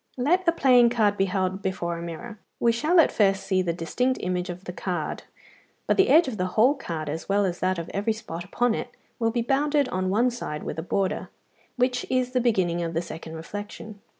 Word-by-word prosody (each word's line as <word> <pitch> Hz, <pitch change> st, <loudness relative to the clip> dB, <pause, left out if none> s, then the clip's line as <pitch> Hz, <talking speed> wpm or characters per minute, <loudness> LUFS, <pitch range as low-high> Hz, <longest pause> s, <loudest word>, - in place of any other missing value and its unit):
Let 345 Hz, +9 st, +1 dB
a -, -, +7 dB
playing 250 Hz, -6 st, +5 dB
card 215 Hz, -4 st, +2 dB
be 195 Hz, -, +2 dB
held 190 Hz, 0 st, -1 dB
before 175 Hz, -3 st, -2 dB
a -, -, -7 dB
mirror. 200 Hz, +7 st, -7 dB, 0.2 s
We 235 Hz, -, +4 dB
shall 305 Hz, +10 st, +3 dB
at 325 Hz, -, +5 dB
first 195 Hz, -2 st, +2 dB
see 190 Hz, -1 st, +1 dB
the 175 Hz, -2 st, 0 dB
distinct 250 Hz, +10 st, -1 dB
image 180 Hz, 0 st, -2 dB
of 180 Hz, +1 st, -6 dB
the 180 Hz, -, -7 dB
card, 175 Hz, -5 st, -3 dB, 0.6 s
but -, -, +2 dB
the 390 Hz, -, +4 dB
edge 315 Hz, +3 st, +6 dB
of 240 Hz, -5 st, -4 dB
the 185 Hz, -1 st, 0 dB
whole 245 Hz, +6 st, +6 dB
card, 165 Hz, -, -5 dB
as 160 Hz, +5 st, -5 dB
well 200 Hz, 0 st, +3 dB
as 175 Hz, -2 st, -2 dB
that 185 Hz, 0 st, 0 dB
of 170 Hz, 0 st, -5 dB
every 205 Hz, +3 st, 0 dB
spot 195 Hz, -6 st, -7 dB
upon 240 Hz, +6 st, 0 dB
it, 245 Hz, -, -4 dB, 0.3 s
will 225 Hz, -1 st, +2 dB
be 235 Hz, 0 st, -1 dB
bounded 285 Hz, +2 st, +2 dB
on 185 Hz, 0 st, -1 dB
one 235 Hz, +6 st, +2 dB
side 150 Hz, -10 st, -5 dB
with -, -, -4 dB
a -, -, -1 dB
border, 190 Hz, +2 st, -1 dB, 0.5 s
which 250 Hz, 0 st, 0 dB
is 255 Hz, -1 st, +1 dB
the 250 Hz, -1 st, +1 dB
beginning 185 Hz, -8 st, +1 dB
of 165 Hz, -1 st, -3 dB
the 165 Hz, -, +1 dB
second 165 Hz, -1 st, -8 dB
reflection. 205 Hz, +4 st, -8 dB
205 Hz, 225 wpm, -25 LUFS, 180-245 Hz, 0.6 s, a